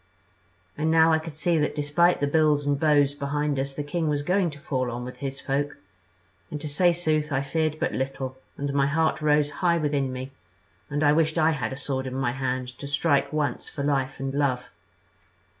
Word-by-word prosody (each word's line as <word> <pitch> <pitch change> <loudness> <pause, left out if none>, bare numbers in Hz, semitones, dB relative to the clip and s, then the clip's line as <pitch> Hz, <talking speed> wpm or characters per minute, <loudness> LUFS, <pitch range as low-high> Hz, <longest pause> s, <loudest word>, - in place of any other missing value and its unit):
"And 155 +1 +1
now 160 0 +5
I 160 - +3
could 160 0 -8
see 170 0 +2
that 150 - 0
despite 155 +4 +2
the - - +3
bills 150 -1 +2
and 145 -1 +1
bows 145 -2 +3
behind 145 0 -1
us 135 0 -3
the 145 - -3
king 160 +2 -1
was 145 -1 0
going 180 +2 +2
to 150 -2 -10
fall 130 -3 -2
on 120 +1 -4
with 125 +1 -8
his 135 -1 -5
folk; 145 +2 -2 0.7
and 150 - -5
to 150 - -5
say 175 +5 +3
sooth 155 -3 0
I 135 0 +1
feared 155 +2 -1
but - - 0
little 130 0 -3 0.2
and 140 0 -2
my 140 0 +3
heart 160 +2 +1
rose 150 -1 +3
high 170 -2 +3
within 145 -4 0
me, 130 +1 -6 0.6
and 145 +1 -1
I 145 - +5
wished 160 +1 +2
I 160 0 +4
had 130 -8 -2
a 130 - -5
sword 135 -1 -3
in 130 - -5
my 130 -2 0
hand 130 -1 -2
to 140 - -6
strike 145 0 +1
once 150 -2 -1
for 140 - -5
life 135 -2 0
and 135 0 -3
love. 135 -3 +1
145 Hz, 210 wpm, -26 LUFS, 135-155 Hz, 0.7 s, now